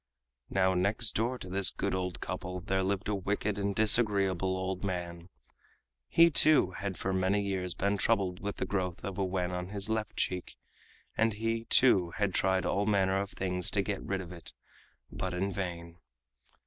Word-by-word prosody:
Now 95 -1 +2
next 100 +4 +2
door 120 +4 -1
to 95 - -9
this 95 +1 +4
good 100 - -2
old 90 -1 -3
couple 90 +1 -4
there 95 0 -1
lived 95 +1 -1
a 105 - 0
wicked 100 +1 -2
and 100 0 -1
disagreeable 100 -4 +2
old 95 0 -3
man. 85 -2 -4 0.8
He, 165 0 +6
too, 150 -11 +5
had 95 0 -5
for 95 - -2
many 95 +2 +1
years 95 -3 -2
been 100 +2 0
troubled 90 -2 +1
with 100 +1 -4
the - - -3
growth 90 -2 -3
of 100 0 -5
a - - +2
wen 90 -1 -1
on 90 0 -4
his 100 0 -4
left 110 -1 -2
cheek, 90 -1 -2 0.6
and 115 0 +2
he, 115 +2 -2
too, 95 -11 +4
had 100 -3 0
tried 95 0 +2
all 100 +2 0
manner 95 -2 +2
of 100 - -4
things 90 -2 -2
to 100 - 0
get 100 0 -3
rid 95 -1 -3
of 90 -1 -9
it, 85 -3 -11 0.6
but 90 -1 -4
in 95 +2 -1
vain. 85 -3 -5
95 Hz, 185 wpm, -30 LUFS, 90-100 Hz, 0.8 s, He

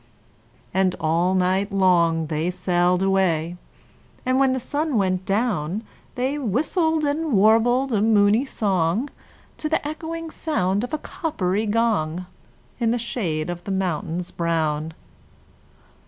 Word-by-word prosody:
And 190 -1 +2
all 170 +4 +1
night 190 +2 +1
long 170 -4 +3
they 155 +2 -1
sailed 180 0 +1
away; 175 -4 +1 0.7
And 255 +1 +2
when 270 -1 +4
the 260 - 0
sun 290 +1 -1
went 185 -2 0
down, 200 -3 0 0.3
They 265 +4 -1
whistled 310 - 0
and 300 0 -1
warbled 230 +5 +4
a 205 - +2
moony 215 +2 +4
song 200 - 0 0.5
To 305 - -2
the 315 -2 0
echoing 325 +1 -5
sound 200 - -1
of 245 - -5
a 310 - 0
coppery 215 - -2
gong, 205 -7 0 0.5
In 230 -2 +1
the 240 - +1
shade 175 -9 -2
of 175 0 -7
the 200 - -5
mountains 180 -2 -2
brown. 160 -2 -1
195 Hz, 130 wpm, -23 LUFS, 175-255 Hz, 0.7 s, when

